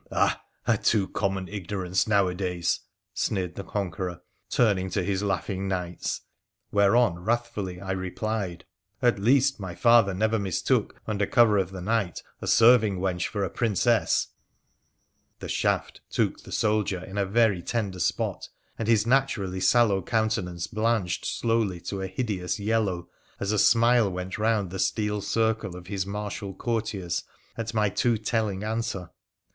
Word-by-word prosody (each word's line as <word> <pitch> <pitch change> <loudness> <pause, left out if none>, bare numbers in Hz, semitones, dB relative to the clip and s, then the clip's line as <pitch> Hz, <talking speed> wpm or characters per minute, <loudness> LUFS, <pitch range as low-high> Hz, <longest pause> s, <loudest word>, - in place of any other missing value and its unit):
' - - -30
Ah! - - +1 0.2
a - - +2
too 100 -4 +2
common 95 -2 -2
ignorance 95 0 -2
nowadays! 90 -4 +1 0.2
' - - -58
sneered 90 -4 -1
the 100 - -6
Conqueror, 90 -3 -4 0.3
turning 100 -6 +2
to 95 0 -1
his 95 +1 -1
laughing 95 -1 -2
knights. 90 -2 -3 0.5
Whereon 100 -2 +3
wrathfully 105 -3 -2
I 95 0 -5
replied: 95 -1 -3 0.2
' 95 +1 -47
At 120 -5 +3
least, 135 +5 +3
my 95 -3 -6
father 115 -5 +5
never 110 +3 +1
mistook, 95 -3 0
under 100 -2 -1
cover 110 -4 +5
of 95 -2 -1
the 95 -1 -7
night, 100 -3 -1 0.2
a - - -5
serving 115 -4 +5
wench 90 -1 -1
for 100 -2 -2
a 95 - -1
Princess! 115 +1 +2 0.6
' - - -46
The - - -6
shaft - - -1
took - - 0
the - - -13
soldier 105 -4 0
in 95 +2 -5
a - - +3
very 105 -3 +3
tender 100 -1 -2
spot, - - -1 0.3
and 110 - -2
his 110 -2 +4
naturally 115 -8 +1
sallow 105 -2 +4
countenance 95 -5 -1
blanched 110 -5 0
slowly 115 -6 0
to 100 +2 -4
a 95 - -2
hideous 95 -2 -2
yellow 100 -5 0 0.3
as 100 - -1
a 105 - +1
smile 115 -1 +4
went 90 +2 -5
round 105 -4 +1
the 95 - -5
steel 105 +1 0
circle 110 -4 0
of 90 0 -9
his 95 0 -3
martial 100 -1 -5
courtiers 105 -7 -2 0.3
at 115 -1 -4
my 105 -1 +3
too 115 +3 +1
telling 105 -3 -1
answer. 110 -5 -3
100 Hz, 155 wpm, -26 LUFS, 95-110 Hz, 0.6 s, father